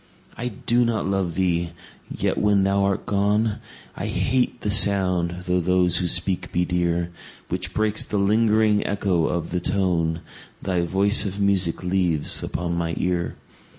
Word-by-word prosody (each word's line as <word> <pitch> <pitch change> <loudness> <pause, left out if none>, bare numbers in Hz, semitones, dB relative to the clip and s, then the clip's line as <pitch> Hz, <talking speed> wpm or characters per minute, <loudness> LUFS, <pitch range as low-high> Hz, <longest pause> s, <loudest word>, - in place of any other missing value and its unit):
I 120 - -4
do 120 +2 +1
not 115 -3 -1
love 95 -3 -1
thee!—yet, 85 -2 -3
when 100 -2 +3
thou 100 0 +2
art 100 -1 -1
gone, 105 +2 +1 0.4
I - - -4
hate 125 -1 0
the 105 - -1
sound 90 -4 +2
(though 90 0 +1
those 90 0 +2
who 90 - 0
speak 90 +1 0
be 90 0 +1
dear) 85 -1 0
10 85 - -8 0.4
Which 90 0 -3
breaks 110 0 +1
the 105 - -3
lingering 105 +1 +3
echo 95 -5 0
of 85 -2 -3
the 90 - 0
tone 85 -4 0 0.4
Thy 90 -2 -1
voice 100 +5 +2
of 100 0 -4
music 95 -4 +1
leaves 90 -4 +1
upon 85 +1 -3
my 85 -1 -2
ear. 90 -1 -1
95 Hz, 155 wpm, -23 LUFS, 85-100 Hz, 0.4 s, when